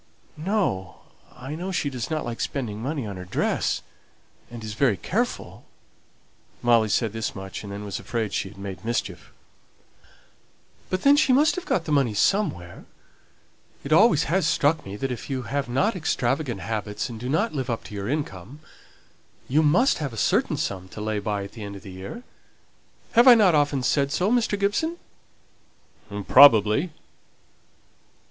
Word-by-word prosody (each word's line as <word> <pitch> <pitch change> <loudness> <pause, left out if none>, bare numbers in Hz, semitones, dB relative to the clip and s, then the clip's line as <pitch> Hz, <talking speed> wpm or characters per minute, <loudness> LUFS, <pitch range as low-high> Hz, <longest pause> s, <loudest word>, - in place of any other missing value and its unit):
"No. 155 - -2 0.3
I 130 +4 -8
know 180 +4 -4
she 145 -6 -1
doesn't 135 +5 -3
like 120 -1 -5
spending 110 -6 -3
money 140 0 -3
on 100 -3 -6
her 90 - -7
dress, 90 - -1 0.7
and 120 -2 -9
is 110 -1 -5
very 115 -3 +2
careful." 85 - -3 1.0
Molly 115 -2 +4
said 110 0 0
this 115 -1 -3
much, 95 -1 -7
and 100 - -8
then 100 +1 -6
was 100 - -4
afraid 110 -4 -3
she 95 - -2
had 95 - -16
made 100 0 -7
mischief. 95 -8 -3 1.6
"But 185 0 -2
then 280 +1 +7
she 280 - +3
must 295 +5 +4
have 365 0 -6
got 165 - 0
the 155 - -4
money 135 -7 +2
somewhere. 100 - 0 1.0
It 140 - 0
always 165 -4 +5
has 170 +1 +1
struck 150 +1 +2
me 95 - -6
that 130 +5 -3
if 125 - -6
you 130 -2 -2
have 140 +4 -3
not 195 - +1
extravagant 135 -5 -1
habits, 105 -1 -3
and 115 -3 -8
do 125 +2 -5
not 190 +11 0
live 135 -3 -3
up 115 - -2
to - - -11
your 100 +1 -4
income, 140 - -4 0.9
you 145 +5 +3
must 170 - +3
have 140 -6 -4
a - - -8
certain - - +1
sum 95 -2 -3
to - - -10
lay 105 0 -2
by 100 -1 -2
at 100 - -9
the 110 - -9
end 100 -1 -7
of 100 - -11
the 95 - -9
year. 95 - -8 0.9
Have 240 +2 +5
I 250 - +11
not 205 -6 +5
often 145 -3 +2
said 140 +2 +1
so, 180 +7 +1
Mr. 235 -4 +1
Gibson?" 315 +13 0 1.3
"Probably." 125 - +6
125 Hz, 170 wpm, -24 LUFS, 105-160 Hz, 1.6 s, I